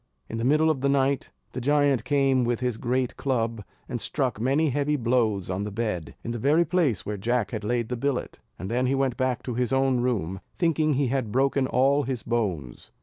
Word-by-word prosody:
In 115 - -4
the - - -2
middle 155 +5 +4
of 135 -4 -3
the 140 - +2
night 140 -1 +1 0.2
the 130 - -5
giant 145 -1 +2
came 135 -3 +2
with 120 -1 0
his 125 -3 -2
great 125 0 -1
club, 115 -5 -1 0.2
and - - -4
struck 110 - -1
many 140 +6 +2
heavy 145 +2 +1
blows 115 -6 +1
on 95 +1 -2
the 105 - -3
bed, 100 -9 -3
in 115 - -4
the 120 - -3
very 150 +8 +3
place 160 - +1
where 105 0 -3
Jack 120 +2 0
had 110 -3 -4
laid 120 +1 -1
the 125 - -1
billet, 135 +1 -2 0.2
and 95 - -6
then 125 +2 +1
he 135 - +1
went 135 -2 0
back 130 -2 -1
to 125 - -4
his 125 0 -1
own 135 -1 +2
room, 100 -7 -1 0.2
thinking 155 -3 +2
he 135 -2 +1
had 130 -5 -1
broken 135 +1 +2
all 135 +3 +3
his 130 -4 -3
bones. 95 - -3
125 Hz, 215 wpm, -26 LUFS, 115-140 Hz, 0.2 s, middle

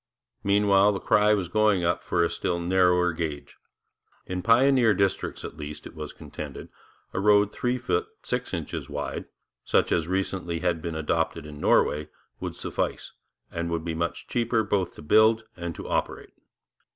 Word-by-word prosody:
Meanwhile, 100 0 +4
the 100 - -3
cry 105 +1 +4
was 95 -4 -2
going 105 -1 +2
up 85 0 0
for 85 -1 +1
a 85 - +2
still 85 0 -1
narrower 90 0 +3
gauge. 80 -3 -5 0.7
In 90 0 -3
pioneer 120 0 +5
districts, 100 0 -1
at - - -8
least, 75 -1 -7
it - - -9
was 75 -1 -7
contended, - - -8 0.4
a - - -1
road 105 0 +4
three 125 +3 -1
feet 435 - 0 0.2
six 125 0 -3
inches 85 -5 -4
wide, - - -4 0.4
such - - +2
as 85 - +2
had 90 - -6
recently 95 -3 -1
been 85 -2 -1
adopted 75 -1 -1
in 75 -1 -9
Norway, 75 0 +2 0.3
would - - -5
suffice, - - -3 0.4
and 85 0 -3
would 85 -1 -2
be 85 - -2
much 85 +1 -3
cheaper 115 -2 +1
both 100 -4 -1
to - - -11
build 110 +7 +5
and 85 -2 -5
to - - -7
operate. - - -2
90 Hz, 165 wpm, -26 LUFS, 85-105 Hz, 0.7 s, pioneer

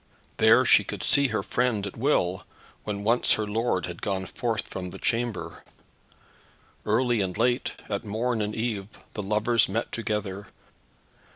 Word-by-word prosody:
There - - +6
she - - +6
could - - -6
see 140 0 +4
her 110 -3 -2
friend 120 -5 0
at 100 - -6
will, 105 -8 +1 0.4
when 100 -1 -3
once 115 +3 +3
her 110 - 0
lord 105 -3 0
had 90 -1 -8
gone 95 -2 -2
forth 115 0 -2
from 90 0 -6
the - - -9
chamber. 115 -8 -2 1.2
Early 120 +1 +2
and 95 -2 -2
late, 125 0 +1
at 100 +1 -3
morn 110 +2 -1
and 105 0 -2
eve, 110 -4 -2 0.3
the 105 - -3
lovers 110 +3 +2
met 115 - -2
together. 105 -3 -3
105 Hz, 155 wpm, -26 LUFS, 100-120 Hz, 1.2 s, There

